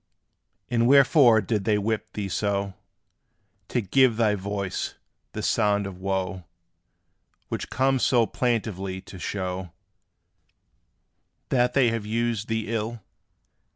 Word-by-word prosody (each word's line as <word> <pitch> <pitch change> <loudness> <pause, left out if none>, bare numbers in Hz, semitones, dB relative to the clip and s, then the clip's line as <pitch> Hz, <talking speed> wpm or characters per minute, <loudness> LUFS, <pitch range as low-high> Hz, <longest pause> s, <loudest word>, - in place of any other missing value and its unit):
And 115 -1 +2
wherefore 135 -4 +6
did 105 0 -1
they 105 +1 +2
whip 110 +1 -2
thee 105 -2 -3
so, 100 0 -1 0.9
To 120 - 0
give 120 +3 +3
thy 110 -3 +3
voice 100 -1 -3 0.4
this - - -2
sound 105 -2 +2
of 95 -2 -7
wo, 95 -1 -2 1.1
Which - - -4
comes 135 0 +1
so 120 -3 +4
plaintively 105 -6 -2
to 95 - -12
show 90 -2 -4 1.8
That 125 -1 +2
they 130 -4 +5
have 115 -2 -3
used 115 -1 -1
thee 110 0 -2
ill? 115 0 -3
110 Hz, 120 wpm, -25 LUFS, 100-120 Hz, 1.8 s, wherefore